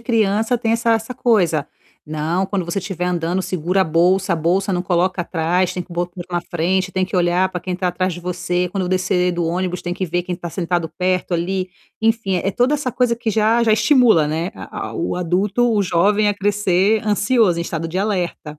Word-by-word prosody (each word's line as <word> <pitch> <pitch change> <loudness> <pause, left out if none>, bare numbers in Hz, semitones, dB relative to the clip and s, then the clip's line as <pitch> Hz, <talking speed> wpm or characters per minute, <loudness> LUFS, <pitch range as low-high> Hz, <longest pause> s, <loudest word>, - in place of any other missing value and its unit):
criança 225 0 +1
tem 225 -1 0
essa 230 0 +2
essa 225 +3 -2
coisa. 175 - +2 0.4
"Não, 155 +4 -1
quando 190 -2 -2
você 170 +3 -2
estiver 180 -2 -3
andando 175 +1 -1
segura 185 +1 -1
a 190 - +4
bolsa, 180 +4 +2
a - - -3
bolsa 185 +5 0
não 180 -1 0
coloca 180 0 0
atrás, 175 +2 0
tem 180 - -4
que 175 - -14
botar 175 +1 -4
na 175 -1 0
frente, 185 +2 0
tem 190 0 +1
que 185 - -4
olhar 180 +1 +2
para 180 -1 -5
quem 180 +1 -4
tá 180 0 -1
atrás 185 +1 -1
de 175 - -7
você, 180 0 -2
quando 190 +1 -3
eu - - -3
descer 180 -1 +1
do 175 0 -1
ônibus 180 +2 -2
tem 175 0 -4
que 185 - -2
ver 175 0 -1
quem 180 0 -4
está 170 0 -7
sentado 175 -1 -1
perto 185 0 0
ali". 185 +2 -1 0.3
Enfim 225 -4 +1
é 185 +2 -1
é - - +1
toda 245 +8 +2
essa 270 -5 -2
coisa 245 -2 +1
que 235 -1 -2
já 220 +2 +2
já 220 - +4
estimula, 215 - +4
né, 165 +4 -2
a - - -7
a - - -9
o 345 - -2
adulto, 195 +7 +1
o 205 -2 +2
jovem 200 +4 +2
a 205 - +1
crescer 205 +1 +2
ansioso 210 -3 +2
em - - -1
estado 165 -1 -4
de 180 +3 -3
alerta. 180 -7 -2
185 Hz, 225 wpm, -19 LUFS, 175-210 Hz, 0.4 s, a